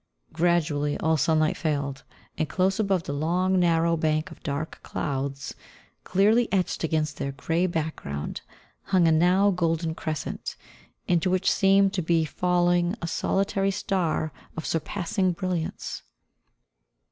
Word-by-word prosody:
Gradually 155 -4 +1
all 160 0 +2
sunlight 155 +1 +2
failed, 140 -3 -2 0.3
and 155 -1 -2
close 190 +3 +1
above 195 -5 +1
the 140 - -4
long, 180 +5 +1
narrow 170 -1 +3
bank 155 -1 0
of - - -13
dark 145 +2 -4
clouds, 135 -1 -3 0.5
clearly 215 +5 +3
etched 185 -4 0
against 155 -2 0
their 140 - -3
grey 165 +6 0
background, 155 - -4 0.4
hung 185 -3 +3
a - - +5
now 180 +5 +4
golden 165 -2 0
crescent, 155 -3 -4 0.5
into 175 +1 +2
which 185 +1 +2
seemed 195 0 +4
to 190 - 0
be 165 -1 +2
falling 175 +2 +1
a - - -4
solitary 195 +3 0
star 180 -5 -1 0.2
of 160 - -4
surpassing 180 +2 -1
brilliance. 180 -2 -3
170 Hz, 130 wpm, -26 LUFS, 155-185 Hz, 0.5 s, a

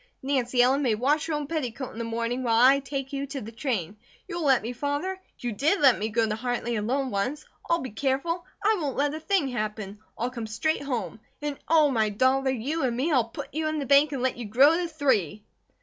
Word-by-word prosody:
Nancy 255 -2 +2
Ellen 265 +3 +3
may 240 -6 +2
wash 285 +8 +1
her 325 - -2
own 295 -1 -2
petticoat 270 -5 -4
in 225 - -8
the - - -2
morning, 230 +2 -2
while 230 -2 +2
I 265 +3 +6
take 275 0 -5
you 280 0 -3
to 275 0 -5
the 225 -2 -8
train. 220 - -3 0.3
You'll 345 -1 -4
let 265 -5 +4
me, 235 +3 -4
Father? 290 +9 -2 0.2
You 245 - -3
did 300 - +1
let 265 -5 +6
me 215 +2 -1
go 225 +1 +1
to 215 - -1
Hartley 240 0 -2
alone, 255 +5 -1
once. 250 +10 -2 0.2
I'll 335 0 +2
be 260 - -6
careful! 275 - -1 0.2
I 430 +1 +3
won't 280 -4 -2
let 290 +1 +1
a 310 - -4
thing 320 -4 +1
happen. 215 -4 -4 0.2
I'll 245 +2 -2
come 235 -3 -5
straight 220 +9 -1
home. 230 - -3 0.2
And 290 -2 -3
oh, 310 -3 +5
my 220 -4 +2
dollar, 260 +5 +2
you 265 +6 -2
and 240 -2 0
me; 290 +7 0
I'll 255 -6 +3
put 285 +3 -8
you 310 +1 -1
in 310 0 -1
the 285 - -2
bank 280 +2 +5
and 265 -3 -3
let 260 - 0
you 240 - -5
grow 265 +9 +5
to 350 0 -1
three!" 245 - 0
265 Hz, 235 wpm, -26 LUFS, 230-290 Hz, 0.3 s, I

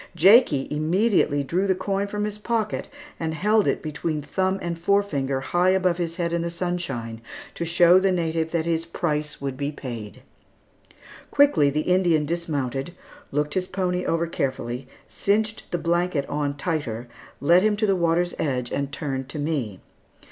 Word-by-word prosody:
Jakie 170 - +5
immediately 155 -1 +2
drew 180 +8 0
the 190 - +3
coin 200 +1 -1
from 210 +1 -3
his 210 0 -4
pocket 220 -1 -1 0.3
and 160 -1 -2
held 210 +4 +2
it - - 0
between 155 0 -3
thumb 190 +4 0
and 170 -1 -4
forefinger, 160 -9 +1
high 175 +7 +2
above 185 -2 +2
his 165 -1 -2
head 170 -1 -2
in 170 - +1
the 170 - -2
sunshine, 170 -11 -3 0.3
to 170 - -3
show 175 +2 +6
the 190 0 +2
native 165 -2 0
that 165 -1 -1
his 165 -1 0
price 150 -3 -2
would 135 -2 -3
be 140 +2 -2
paid. 120 -7 -8 1.1
Quickly 195 - +4
the 150 +2 0
Indian 175 -3 +2
dismounted, 145 -2 -3 0.4
looked 150 +1 0
his 185 -1 -1
pony 180 -1 -1
over 165 0 0
carefully, 130 -5 -3 0.2
cinched 215 +2 -1
the 175 - -1
blanket 170 -3 0
on 145 -1 -2
tighter, 135 -7 -3 0.3
led 170 +6 +5
him 210 0 +2
to 215 - +1
the 195 -2 +3
water's 175 0 +1
edge, 125 -5 -1
and 140 0 -2
turned 135 -3 -4
to - - -6
me. 140 - -2
165 Hz, 165 wpm, -24 LUFS, 145-185 Hz, 1.1 s, show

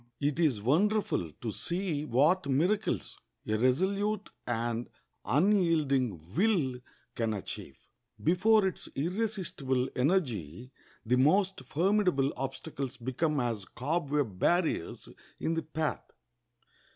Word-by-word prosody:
It 145 +2 0
is 135 -11 +2
wonderful 170 - +1
to 110 +9 -5
see 170 - -2
what 150 +7 +3
miracles 180 +11 0 0.3
a 110 - 0
resolute 190 - +1 0.2
and 120 0 -2 0.4
unyielding 140 - +2
will 165 - +2 0.3
can 115 -2 -1
achieve. 100 - -7 0.5
Before 195 +5 +4
its 190 - -3
irresistible 170 - -1
energy 125 - 0 0.3
the 125 +3 +3
most 185 +6 +3
formidable 180 -5 +2
obstacles 135 0 -5
become 135 +5 -1
as 115 -5 -1
cobweb 140 - -2
barriers 170 - +1 0.3
in 165 - 0
the 165 - 0
path. 155 0 -3
145 Hz, 105 wpm, -30 LUFS, 125-180 Hz, 0.5 s, Before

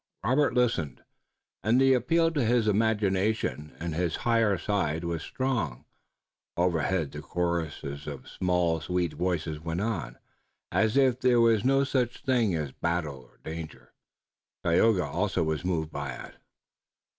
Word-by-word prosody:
Robert 130 +5 +2
listened 115 - 0 0.6
and 110 +6 +3
the 135 0 +5
appeal 165 +7 +2
to 145 -5 0
his 115 -1 +2
imagination 105 -6 0
and 85 -1 -3
higher 100 +5 +1
side 85 -4 -1
was 85 -2 -2
strong. 100 - -2 0.7
Overhead 85 -2 +1
the 75 - -7
chorus 85 -1 -2
of 70 -1 -7
small 90 -3 0
sweet 90 0 -1
voices 85 -4 -2
went 80 +3 -3
on, 90 - -3 0.5
as 110 +3 +2
if 130 -3 +4
there 125 -2 +4
were 115 -2 +5
no 135 +1 +3
such 130 -3 -1
things 120 - +2
as 75 -4 -3
battle 80 -3 -2
or 60 - -20
danger. 80 0 -8 0.7
Tayoga 90 +2 +3
also 90 +4 0
was 80 -1 -2
moved 80 -4 -1
by - - -4
it. - - -10
90 Hz, 135 wpm, -28 LUFS, 80-115 Hz, 0.7 s, the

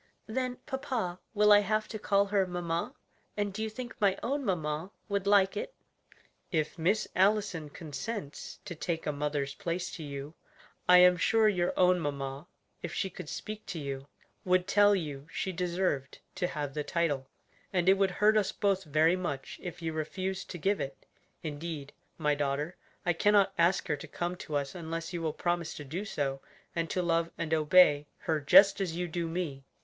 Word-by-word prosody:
"Then, 255 +2 -2
papa, 245 -10 -3 0.2
will 210 0 +5
I 205 - +9
have 215 +1 0
to 215 - -5
call 200 -1 +3
her 200 -2 +1
mamma? 175 - -2 0.4
and 205 -1 -1
do 215 - -4
you 220 - -1
think 240 +2 -7
my 195 -2 +3
own 280 +3 -1
mamma 160 -4 -1 0.2
would 200 -1 -1
like 200 -1 +5
it?" - - -4 0.8
"If 155 -4 0
Miss 195 +7 +2
Allison 190 -5 +2
consents 150 - -6
to - - -5
take 165 0 -3
a 150 - +1
mother's 145 -1 -2
place 180 -2 -3
to 160 - -7
you, 140 +1 -6 0.6
I 180 - +10
am 180 0 +7
sure 220 +5 +4
your 180 -4 +2
own 180 0 +5
mamma, 140 0 -4 0.3
if - - -4
she 190 - -1
could 155 - -8
speak 215 0 -6
to 185 -4 -4
you, 140 -1 -5 0.4
would 185 0 +2
tell 205 0 +5
you 150 -5 -4
she 190 - -2
deserved 175 -6 -1 0.2
to 180 - -1
have 145 -5 -4
the 150 - -2
title; 145 -6 0 0.4
and 180 -2 +1
it 190 - +8
would 195 0 +2
hurt 210 +3 +3
us 200 -2 +2
both 195 -3 0
very 155 +3 +3
much 145 -7 -4
if 175 -1 -7
you 160 -1 -2
refused 185 +5 -3
to 175 - -5
give 195 +4 +1
it. 135 0 -6 0.4
Indeed, 150 -2 -5 0.2
my 150 0 +2
daughter, 145 +4 -1 0.3
I 175 - +3
cannot 200 +2 +4
ask 170 +2 +2
her 150 - 0
to - - -9
come 175 +1 -3
to 155 - -5
us 140 -1 -1
unless 165 -1 -5
you 170 - -3
will 160 -1 0
promise 175 0 -1
to 150 - -7
do 165 +9 -4
so, 135 -8 -2 0.3
and 165 -1 -1
to 180 - 0
love 165 -1 +1
and 160 -1 -2
obey, 150 -2 +5
her 160 -2 0
just 195 +8 +7
as 175 -4 -1
you 175 0 -1
do 170 0 -2
me. 165 -5 -3
175 Hz, 190 wpm, -30 LUFS, 150-195 Hz, 0.8 s, I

